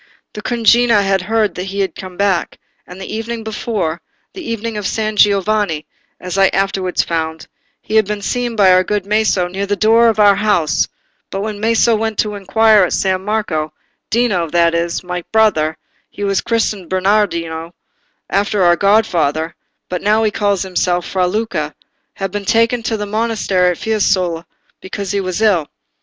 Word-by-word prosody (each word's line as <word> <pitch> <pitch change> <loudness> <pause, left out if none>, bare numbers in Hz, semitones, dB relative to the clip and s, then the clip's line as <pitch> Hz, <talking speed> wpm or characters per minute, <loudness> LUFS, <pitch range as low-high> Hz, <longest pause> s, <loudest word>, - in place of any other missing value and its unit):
"The 210 - -7
cugina 235 -2 +3
had 195 -1 +1
heard 215 +2 0
that 180 - -5
he 195 +1 -3
was 190 - 0
come 185 -1 -9
back, 200 -3 0 0.3
and 180 +1 -11
the 195 +2 -6
evening 225 +1 -4
before—the 210 - -5
evening 230 -5 -4
of 205 -3 -2
San 215 -1 -2
Giovanni—as 195 -3 0
I 195 - +6
afterwards 195 -2 0
found, 160 -1 -3 0.4
he 220 - 0
had 220 - +4
been 210 -1 -4
seen 245 0 -2
by 195 -4 +5
our 185 0 +4
good 205 0 -2
Maso 210 -3 +1
near 195 +3 -4
the 205 - 0
door 225 +3 +4
of 220 - -1
our 205 -2 +5
house; 205 -7 +1 0.4
but 195 - -4
when 210 -1 -4
Maso 225 +1 +3
went 220 -1 -2
to 210 -1 0
inquire 210 +2 +3
at 180 - 0
San 190 -1 0
Marco, 185 -8 -2 0.4
Dino, 205 -8 +1
that 170 0 +2
is, 170 +1 -1
my 180 -1 -4
brother—he 205 -3 -1
was 195 -1 +1
christened 215 -6 -1
Bernardino, 175 -4 0 0.5
after 200 0 0
our 175 0 +5
godfather, 170 -6 +1 0.3
but 180 -1 -4
now 215 +2 +2
he 215 - +1
calls 200 -2 0
himself 180 -1 -1
Fra 185 -1 0
Luca—had 195 -1 -5
been 205 0 -4
taken 230 +3 +2
to 225 0 -2
the 210 - -3
monastery 205 -4 0
at 175 - -2
Fiesole, 185 -6 0 0.4
because 190 0 -5
he 200 - 0
was 185 +3 -2
ill. 180 -9 +3
200 Hz, 165 wpm, -17 LUFS, 180-215 Hz, 0.5 s, I